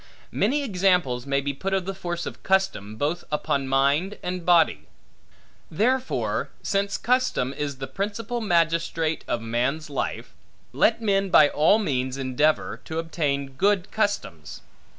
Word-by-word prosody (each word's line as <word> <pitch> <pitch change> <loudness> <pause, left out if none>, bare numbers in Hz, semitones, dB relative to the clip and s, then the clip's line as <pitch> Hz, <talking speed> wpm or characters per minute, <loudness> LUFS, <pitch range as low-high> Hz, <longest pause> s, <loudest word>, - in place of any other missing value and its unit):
Many 280 +8 +1
examples 180 - +1
may 140 0 +1
be 140 0 -2
put 195 +7 -2
of 190 -2 -1
the 195 - -3
force 175 -3 -4
of - - -7
custom, 190 - 0
both 155 +9 -2
upon 140 -2 -1
mind 140 +9 +1
and 180 -1 -3
body. 170 -2 +3 0.8
Therefore, 255 +9 0
since 200 0 0
custom 245 - +1
is 145 -1 -4
the 135 - -5
principal 210 - -4
magistrate 165 -4 +1
of 120 - -1
man's 125 +7 -1
life, 140 - -4 0.4
let 230 0 +2
men 195 -2 +1
by 150 -5 +7
all 155 +8 +4
means 130 - -1
endeavor, 135 +4 0
to 160 - -5
obtain 145 -4 -2
good 195 +6 +1
customs. 90 - -2
165 Hz, 140 wpm, -25 LUFS, 140-195 Hz, 0.8 s, by